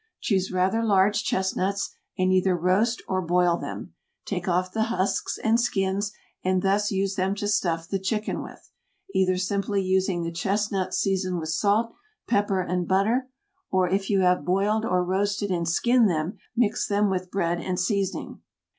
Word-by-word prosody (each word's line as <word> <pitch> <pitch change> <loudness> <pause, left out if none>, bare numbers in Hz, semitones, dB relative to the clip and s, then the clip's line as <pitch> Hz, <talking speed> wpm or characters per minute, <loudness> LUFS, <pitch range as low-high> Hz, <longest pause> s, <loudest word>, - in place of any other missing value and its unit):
Choose 190 -4 0
rather 185 +5 +1
large 205 0 +3
chestnuts 190 +1 -1 0.2
and 185 0 +2
either 185 -1 +3
roast 195 +8 +1
or 185 -1 0
boil 175 0 +2
them; - - -7 0.3
take 180 -3 -3
off 180 +1 +1
the 220 +2 0
husks 200 -4 -1
and 225 +2 +3
skins 200 -3 0 0.3
and 185 0 +1
thus 205 +2 +2
use 195 -1 0
them 190 0 0
to 205 0 -3
stuff 170 -6 0
the 195 0 -2
chicken 210 +3 -2
with, - - -12 0.4
either 185 -1 +2
simply 200 +2 -1
using 185 -2 +1
the 165 - -3
chestnuts 195 +2 -1
seasoned 185 -2 0
with 160 -1 -5
salt, 205 +8 +1 0.3
pepper 200 -4 +1
and 180 -1 -2
butter, 225 +7 +1 0.4
or 185 -1 +2
if 195 +2 -1
you 195 -2 +3
have 180 -3 +3
boiled 205 +6 +1
or 180 -4 +1
roasted 200 +2 0
and 170 -2 0
skinned 235 +5 +3
them, 160 +2 -2 0.2
mix 225 -3 +1
them 205 0 +2
with 185 -1 -2
bread 175 -3 0
and 185 -1 -2
seasoning. 195 0 -2
190 Hz, 165 wpm, -25 LUFS, 185-205 Hz, 0.4 s, large